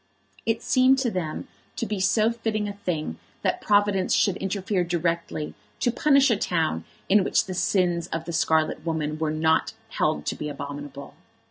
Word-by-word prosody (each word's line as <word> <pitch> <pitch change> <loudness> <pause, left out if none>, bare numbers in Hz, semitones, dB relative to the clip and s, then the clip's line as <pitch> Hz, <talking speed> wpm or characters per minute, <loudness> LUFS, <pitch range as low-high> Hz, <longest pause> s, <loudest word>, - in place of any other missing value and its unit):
It 225 0 0
seemed 260 +1 +4
to 260 -3 0
them 170 -5 -3 0.3
to - - -2
be 210 -3 -3
so 215 +4 +3
fitting 220 -2 -2
a 205 - -4
thing 160 - -3 0.2
that - - 0
Providence 205 -2 +3
should 195 - +3
interfere 195 -1 -1
directly 170 -3 -2 0.3
to 240 - +2
punish 275 +1 +4
a 220 - +3
town 160 - 0 0.2
in 205 0 +5
which - - +2
the 190 - -5
sins 175 -2 +1
of 165 0 -4
the 170 - -5
scarlet 160 -1 +1
woman 155 -2 -2
were 160 -1 0
not 160 +1 +1 0.2
held 75 0 0
to - - -1
be 150 - -4
abominable! 140 -1 -7
180 Hz, 170 wpm, -25 LUFS, 155-210 Hz, 0.3 s, in